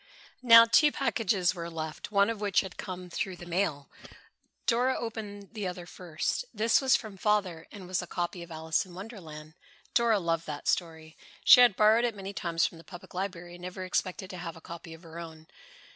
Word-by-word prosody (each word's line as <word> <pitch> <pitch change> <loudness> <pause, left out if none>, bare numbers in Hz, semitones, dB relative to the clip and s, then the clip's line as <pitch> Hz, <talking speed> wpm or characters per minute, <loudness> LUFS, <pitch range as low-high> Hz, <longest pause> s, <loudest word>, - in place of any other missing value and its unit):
Now 230 -2 +9
two 295 +6 +5
packages 200 -10 +1
were 170 -2 -6
left, 160 +2 -6
one 200 +1 +4
of 220 -2 -6
which 205 -2 +2
had 190 -2 -8
come 185 -1 -7
through 185 +2 -3
the 175 - -11
mail. 170 -5 -1 0.8
Dora 250 +2 +2
opened 210 -4 -6
the 210 -4 -3
other 180 -1 -6
first. 175 - -3
This 225 +4 +2
was 265 -1 +4
from 215 -4 -5
Father 190 -5 0
and 195 -4 -10
was 185 0 -1
a 180 - -8
copy 175 0 -3
of 170 - -10
"Alice 160 +3 -1
in 180 -3 -14
Wonderland." 165 -7 -9 0.4
Dora 235 -2 +4
loved 165 -3 -1
that 150 -1 -6
story. 160 -2 -2 0.3
She - - +9
had 245 -5 +7
borrowed 215 +3 +5
it 235 -3 0
many 195 0 -7
times 170 -3 0
from 165 - -5
the - - -13
Public 185 +1 -12
Library 180 -2 -5
and 175 - -12
never 185 +1 -6
expected 185 0 -2
to 185 - -7
have 170 -2 -6
a - - -11
copy 165 0 -9
of 160 - -18
her 165 0 -9
own. 160 -2 -10
185 Hz, 205 wpm, -29 LUFS, 170-210 Hz, 0.8 s, Now